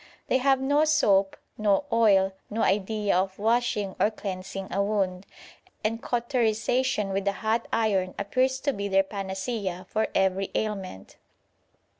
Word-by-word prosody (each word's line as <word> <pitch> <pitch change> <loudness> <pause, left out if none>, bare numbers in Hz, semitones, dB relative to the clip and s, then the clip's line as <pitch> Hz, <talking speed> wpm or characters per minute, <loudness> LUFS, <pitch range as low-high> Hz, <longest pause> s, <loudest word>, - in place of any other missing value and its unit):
They 260 - +3
have 270 0 +3
no 285 +3 +2
soap, 200 -11 +3 0.2
no 210 +5 +2
oil, 195 -4 +4 0.2
no 225 +2 -1
idea 205 +1 +1
of 190 +1 0
washing 215 -3 0
or 210 - +4
cleansing 195 -2 -6
a 200 - +1
wound, 195 -2 -1 0.6
and 225 +2 -1
cauterisation 240 -2 0
with 195 +1 -2
a 200 - +2
hot 220 +3 -1
iron 195 -5 +1
appears 255 +6 0
to 280 - 0
be 200 -2 -3
their 195 0 +3
panacea 190 -1 -4
for 220 +2 0
every 190 0 +1
ailment. 195 - -4
205 Hz, 140 wpm, -26 LUFS, 195-230 Hz, 0.6 s, oil